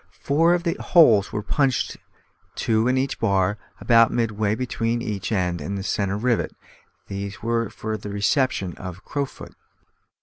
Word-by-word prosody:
Four 165 +5 +3
other 170 -1 -1
holes 115 - +5
were 105 - -3
punched, 130 +2 0 0.6
two 110 +1 +1
in 130 +1 +2
each 135 +1 -1
bar, 100 -1 +1 0.2
about 115 -2 +5
midway 110 -3 0
between 120 -1 -1
each 105 -3 -4
end 90 -5 0
and 100 +7 -4
the 95 - -4
centre 100 -1 -1
rivet; 120 +1 0 0.5
these 100 +1 -6
were 115 -1 0
for 110 0 -4
the 105 - -8
reception 100 - 0
of 90 -2 -7
a - - -19
crowfoot. 140 +2 -5
110 Hz, 155 wpm, -23 LUFS, 100-125 Hz, 0.6 s, holes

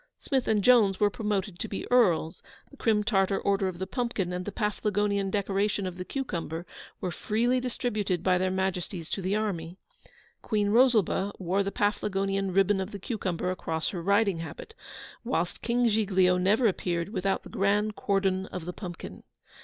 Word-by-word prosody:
Smith 265 -3 -1
and 210 -2 +2
Jones 215 -6 +5
were 205 -1 +3
promoted 205 -4 -2
to - - -2
be 200 - -5
Earls; 175 -9 +3 0.3
the - - -14
Crim 220 -5 +2
Tartar 195 -2 +2
Order 195 -1 +1
of 185 -2 -4
the 190 - -3
Pumpkin 200 -4 -2
and 180 0 -3
the 205 - -4
Paflagonian 205 -1 0
decoration 200 0 0
of 180 -1 -5
the 180 - -4
Cucumber 175 - -4 0.3
were 180 - -3
freely 235 +8 +1
distributed 215 -8 -2
by 180 -1 +3
their 185 0 +1
Majesties 185 -2 -2
to 195 - -2
the 190 +2 0
army. 185 -5 -2 0.6
Queen 210 -2 0
Rosalba 220 -5 +3
wore 190 +2 0
the 200 0 -2
Paflagonian 195 -2 0
Ribbon 195 +1 +3
of 190 - -4
the 205 - -7
Cucumber 185 -5 -2
across 160 -3 -2
her 180 - -4
riding 200 0 +2
habit, 165 - -8 0.5
whilst - - -2
King 240 0 +2
Giglio 190 -4 +3
never 210 +7 +3
appeared 175 -4 0
without 195 -2 -1
the - - -11
grand 205 +2 +1
Cordon 190 -1 0
of 180 -3 -6
the 180 - -5
Pumpkin. 175 -4 -8
195 Hz, 170 wpm, -28 LUFS, 185-210 Hz, 0.6 s, Jones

